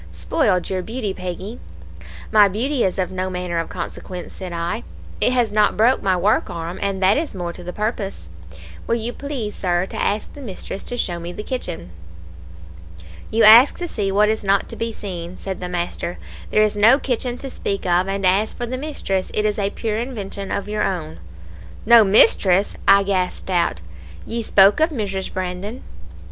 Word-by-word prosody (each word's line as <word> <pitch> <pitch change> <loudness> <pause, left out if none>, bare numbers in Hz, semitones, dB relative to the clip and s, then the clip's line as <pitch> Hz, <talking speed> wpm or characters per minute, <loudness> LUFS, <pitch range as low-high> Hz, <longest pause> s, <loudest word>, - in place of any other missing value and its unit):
Spoiled 170 - 0
your 185 -1 -2
beauty, 220 0 -4
Peggy.' 185 +5 -6 0.7
"'My 210 -1 +7
beauty 240 +7 0
is 185 - 0
of 185 -1 -1
no 185 0 -2
manner 180 -2 -3
of 165 - -3
consequence,' 180 0 -7
said 185 -2 -7
I, 170 - -3 0.4
'it - - +3
has 245 -4 +1
not 210 0 +2
broke 235 +5 +4
my 190 -2 +2
work 200 +5 +2
arm, 170 +1 -5
and 195 -1 -1
that 190 +3 +5
is 305 -7 -3
more 175 -2 -4
to 180 - -10
the 180 - -5
purpose. 210 - -4 0.6
Will 230 - +2
you 235 +1 -3
please, 265 -8 -4
Sir, 175 -1 0
to - - -4
ask 210 +1 -1
the 290 - -10
mistress 195 -4 -6
to 245 - -4
show 175 -7 -2
me 170 +1 -6
the 210 - -7
kitchen?' 90 - -5 1.4
"'You 225 +1 +2
ask 230 +6 +8
to 350 - -4
see 205 -10 -2
what 210 +2 +4
is 220 0 0
not 195 0 +2
to - - -6
be 230 0 -3
seen,' 180 -4 -7
said 190 -1 -5
the 180 - -5
master. 175 0 -3 0.3
'There 215 - +4
is 215 -1 +1
no 220 +6 +6
kitchen 250 -2 -2
to 270 0 -7
speak 195 -5 -3
of, 180 +1 +2
and 195 0 -2
as 195 +4 +2
for 245 - -4
the 255 +2 -4
mistress, 230 -11 -2
it 210 - +1
is 210 0 0
a 200 -1 +1
pure 215 0 -3
invention 205 -5 -5
of 200 - -2
your 210 0 -2
own.' 170 - -2 0.7
"'No 235 0 +8
mistress?' 195 -1 +4
I 200 0 +7
gasped 190 -1 -2
out; 170 - +1 0.4
'ye 235 +1 -3
spoke 200 0 +5
of 315 +2 +4
Mrs. 200 - -3
Brandon.' 185 +6 -5
200 Hz, 190 wpm, -21 LUFS, 180-225 Hz, 1.4 s, ask